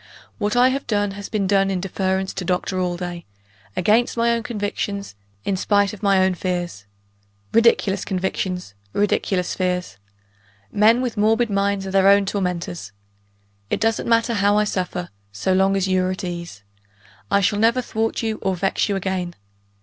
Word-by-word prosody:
What 210 Hz, +2 st, 0 dB
I 250 Hz, +1 st, +6 dB
have 275 Hz, +2 st, -3 dB
done, 205 Hz, -3 st, +1 dB
has 200 Hz, +1 st, -7 dB
been 210 Hz, -3 st, 0 dB
done 195 Hz, 0 st, +3 dB
in 190 Hz, -1 st, -1 dB
deference 190 Hz, 0 st, -1 dB
to 190 Hz, -, -4 dB
Doctor 180 Hz, +1 st, -1 dB
Allday 175 Hz, -1 st, -3 dB, 0.5 s
against 220 Hz, +6 st, +2 dB
my 235 Hz, 0 st, +3 dB
own 235 Hz, 0 st, +1 dB
convictions; 205 Hz, -, -3 dB, 0.3 s
in 200 Hz, -, +1 dB
spite 200 Hz, +1 st, +2 dB
of 210 Hz, -, -10 dB
my 200 Hz, -2 st, +3 dB
own 190 Hz, -, +1 dB
fears. 175 Hz, -, -3 dB, 0.7 s
Ridiculous 225 Hz, -4 st, +3 dB
convictions! 185 Hz, -, -3 dB, 0.2 s
ridiculous 195 Hz, -3 st, 0 dB
fears! 180 Hz, -, -2 dB, 0.7 s
Men 225 Hz, +4 st, +4 dB
with 240 Hz, -3 st, -3 dB
morbid 220 Hz, +2 st, +2 dB
minds 200 Hz, 0 st, 0 dB
are 190 Hz, -, -4 dB
their 195 Hz, 0 st, +4 dB
own 200 Hz, 0 st, +6 dB
tormentors. 180 Hz, -, -3 dB, 0.8 s
It -, -, 0 dB
doesn't 225 Hz, +1 st, 0 dB
matter 230 Hz, 0 st, +3 dB
how 205 Hz, -1 st, +3 dB
I 210 Hz, -, +4 dB
suffer, 180 Hz, -3 st, -3 dB, 0.2 s
so 100 Hz, -, 0 dB
long 190 Hz, +1 st, +3 dB
as 195 Hz, 0 st, 0 dB
you 185 Hz, -1 st, +2 dB
are 185 Hz, -, 0 dB
at 185 Hz, +1 st, -4 dB
ease. 170 Hz, -, -6 dB, 0.7 s
I 200 Hz, -, +4 dB
shall 205 Hz, +1 st, +1 dB
never 230 Hz, +3 st, +3 dB
thwart 225 Hz, 0 st, -2 dB
you 220 Hz, -1 st, -2 dB
or 190 Hz, -1 st, 0 dB
vex 195 Hz, +3 st, 0 dB
you 200 Hz, -, +1 dB
again. 185 Hz, -2 st, -2 dB
195 Hz, 170 wpm, -22 LUFS, 185-210 Hz, 0.8 s, I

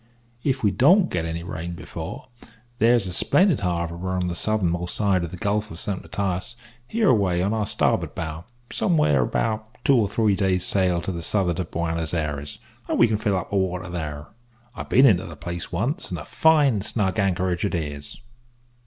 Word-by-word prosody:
If 135 Hz, -3 st, 0 dB
we 105 Hz, -, +4 dB
don't 175 Hz, -, +4 dB
get 85 Hz, -2 st, -1 dB
any 85 Hz, +1 st, -4 dB
rain 85 Hz, 0 st, -5 dB
before, 85 Hz, -, -7 dB, 0.5 s
there's 115 Hz, -1 st, +4 dB
a 90 Hz, -, -3 dB
splendid 170 Hz, -, +3 dB
harbour 85 Hz, 0 st, -2 dB
on 90 Hz, -1 st, -1 dB
the -, -, -2 dB
southernmost 90 Hz, -3 st, 0 dB
side 100 Hz, -4 st, +2 dB
of 85 Hz, -, -4 dB
the 90 Hz, -, -8 dB
Gulf 105 Hz, +3 st, -1 dB
of 80 Hz, -, -9 dB
Saint 95 Hz, +2 st, -1 dB
Matias, 90 Hz, +5 st, -2 dB, 0.3 s
hereaway 105 Hz, -, +2 dB
on 100 Hz, +4 st, +1 dB
our 110 Hz, -2 st, -1 dB
starboard -, -, 0 dB
bow, 80 Hz, +1 st, -5 dB, 0.3 s
somewheres 75 Hz, -, +2 dB
about 110 Hz, +1 st, -2 dB
two 140 Hz, -, +5 dB
or 110 Hz, -5 st, +2 dB
three 105 Hz, -1 st, +2 dB
days' 95 Hz, -2 st, +1 dB
sail 90 Hz, -3 st, +1 dB
to -, -, -2 dB
the 85 Hz, -2 st, -5 dB
south'ard 90 Hz, -1 st, +1 dB
of 90 Hz, -, -3 dB
Buenos 85 Hz, 0 st, -1 dB
Ayres, 75 Hz, -3 st, -3 dB, 0.3 s
and -, -, 0 dB
we 120 Hz, -, +6 dB
can 110 Hz, -1 st, 0 dB
fill 105 Hz, -3 st, 0 dB
up 95 Hz, -, -5 dB
our 100 Hz, -, +3 dB
water 90 Hz, -1 st, -2 dB
there. 75 Hz, -4 st, -5 dB, 0.5 s
I've -, -, -7 dB
been 130 Hz, +3 st, +6 dB
into 95 Hz, -10 st, +4 dB
the 80 Hz, -, -9 dB
place 85 Hz, +3 st, -5 dB
once, 125 Hz, -, -1 dB
and -, -, -3 dB
a -, -, -8 dB
fine 150 Hz, -, +3 dB
snug 95 Hz, -1 st, -1 dB
anchorage 90 Hz, -2 st, 0 dB
it 100 Hz, -, 0 dB
is." 75 Hz, -3 st, -5 dB
95 Hz, 190 wpm, -24 LUFS, 85-110 Hz, 0.5 s, we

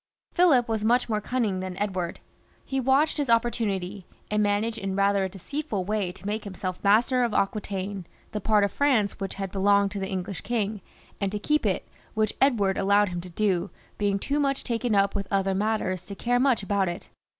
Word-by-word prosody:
Philip 300 Hz, -10 st, +4 dB
was 220 Hz, -2 st, -1 dB
much 245 Hz, +2 st, +2 dB
more 215 Hz, -1 st, 0 dB
cunning 215 Hz, -5 st, -1 dB
than 185 Hz, -1 st, -5 dB
Edward. 185 Hz, -4 st, -2 dB, 0.4 s
He 270 Hz, -, -1 dB
watched 270 Hz, +5 st, +2 dB
his 285 Hz, -4 st, -1 dB
opportunity, 210 Hz, -5 st, 0 dB, 0.2 s
and 210 Hz, 0 st, +2 dB
managed 210 Hz, +2 st, 0 dB
in 195 Hz, -1 st, -3 dB
rather 200 Hz, 0 st, +3 dB
a 190 Hz, -, -1 dB
deceitful 205 Hz, -, -4 dB
way 205 Hz, -3 st, -1 dB
to 190 Hz, +1 st, -14 dB
make 210 Hz, +1 st, -2 dB
himself 185 Hz, -2 st, -5 dB
master 230 Hz, +5 st, +4 dB
of 235 Hz, -3 st, -1 dB
Aquitaine, 195 Hz, -2 st, -2 dB, 0.2 s
the 210 Hz, -, -3 dB
part 210 Hz, 0 st, +3 dB
of 200 Hz, -, +1 dB
France 245 Hz, -8 st, +1 dB
which 195 Hz, -1 st, -4 dB
had 195 Hz, -1 st, -4 dB
belonged 200 Hz, 0 st, +3 dB
to 200 Hz, -, -4 dB
the 190 Hz, 0 st, -3 dB
English 190 Hz, 0 st, -4 dB
king, 215 Hz, -3 st, -2 dB, 0.4 s
and 195 Hz, -1 st, 0 dB
to 210 Hz, -, -2 dB
keep 300 Hz, +8 st, +1 dB
it, -, -, -1 dB, 0.3 s
which 215 Hz, -1 st, +1 dB
Edward 215 Hz, -8 st, +3 dB
allowed 200 Hz, +1 st, +3 dB
him 175 Hz, -1 st, -4 dB
to 180 Hz, -, -10 dB
do, 190 Hz, 0 st, 0 dB, 0.3 s
being 200 Hz, -1 st, +1 dB
too 280 Hz, +8 st, -1 dB
much 275 Hz, -1 st, 0 dB
taken 235 Hz, -2 st, 0 dB
up 200 Hz, 0 st, +3 dB
with 200 Hz, -2 st, -3 dB
other 195 Hz, -1 st, +1 dB
matters 195 Hz, -3 st, -1 dB
to 200 Hz, -, -6 dB
care 245 Hz, +5 st, +1 dB
much 255 Hz, -5 st, +2 dB
about 195 Hz, -2 st, +1 dB
it. 175 Hz, -, -7 dB
205 Hz, 200 wpm, -26 LUFS, 195-230 Hz, 0.4 s, Philip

